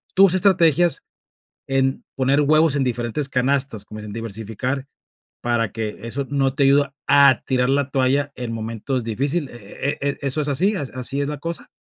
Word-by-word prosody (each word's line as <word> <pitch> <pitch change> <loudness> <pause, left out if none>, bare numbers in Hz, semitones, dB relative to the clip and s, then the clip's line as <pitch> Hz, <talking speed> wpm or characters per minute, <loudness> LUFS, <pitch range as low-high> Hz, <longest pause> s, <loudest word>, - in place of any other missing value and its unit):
tus 195 -2 +6
estrategias 175 -3 +3 0.6
en 135 0 0
poner 135 +2 +2
huevos 155 0 +3
en 140 - +1
diferentes 125 +3 -1
canastas, 130 -3 0
como 110 +1 -9
dicen 105 -1 -8
diversificar, 115 +4 -4 0.6
para 120 -2 0
que 110 -2 -4
eso 130 +4 -4
no 135 -2 +1
te 140 - +2
ayuda 140 0 +3
a 140 -2 +6
tirar 125 -1 +1
la 140 0 +1
toalla 140 +2 +1
en 125 -2 -5
momentos 115 +3 -3
difíciles, 135 +7 -2
¿eh 105 -4 -10
eh 150 - -6
eh 140 0 -1
eso 140 +2 +1
es 145 - 0
así, 190 +10 +2
así 135 -2 -3
es 140 - -1
la 150 - -4
cosa? 165 +3 -5
135 Hz, 175 wpm, -21 LUFS, 120-145 Hz, 0.6 s, tus